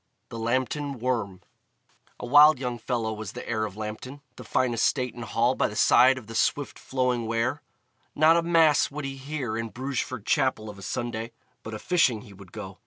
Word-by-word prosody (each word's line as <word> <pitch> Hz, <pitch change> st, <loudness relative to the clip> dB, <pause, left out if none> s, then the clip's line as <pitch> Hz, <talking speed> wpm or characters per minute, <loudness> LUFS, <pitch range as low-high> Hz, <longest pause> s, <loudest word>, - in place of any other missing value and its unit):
The 115 Hz, -, -7 dB
Lambton 130 Hz, +4 st, -1 dB
Worm 115 Hz, -6 st, -2 dB, 0.8 s
A -, -, -5 dB
wild 145 Hz, +4 st, +7 dB
young 125 Hz, -2 st, -4 dB
fellow 115 Hz, -1 st, -2 dB
was 110 Hz, -1 st, -7 dB
the -, -, -8 dB
heir 110 Hz, -2 st, -1 dB
of 105 Hz, -1 st, -8 dB
Lambton, 110 Hz, +6 st, -7 dB
the -, -, -10 dB
fine 125 Hz, -2 st, 0 dB
estate 125 Hz, +2 st, 0 dB
and 120 Hz, -, -8 dB
hall 115 Hz, +2 st, +1 dB
by -, -, +1 dB
the 105 Hz, -, -8 dB
side 130 Hz, +4 st, +5 dB
of 125 Hz, -, -9 dB
the 115 Hz, -, -10 dB
swift 145 Hz, +4 st, 0 dB
flowing 125 Hz, -3 st, -1 dB
Wear. 115 Hz, 0 st, -1 dB, 0.5 s
Not 155 Hz, +2 st, +5 dB
a 170 Hz, -, +3 dB
Mass 165 Hz, -3 st, +4 dB
would 145 Hz, 0 st, -6 dB
he 135 Hz, 0 st, -5 dB
hear 135 Hz, -4 st, -4 dB
in 115 Hz, 0 st, -3 dB
Brugeford 130 Hz, -3 st, -4 dB
Chapel 130 Hz, -7 st, 0 dB
of 100 Hz, -, -14 dB
a -, -, -11 dB
Sunday, 115 Hz, +2 st, -4 dB, 0.3 s
but 110 Hz, 0 st, -7 dB
a -, -, -4 dB
fishing 130 Hz, -6 st, +2 dB
he 105 Hz, -5 st, -14 dB
would 95 Hz, -2 st, -15 dB
go. -, -, -9 dB
120 Hz, 200 wpm, -26 LUFS, 110-135 Hz, 0.8 s, wild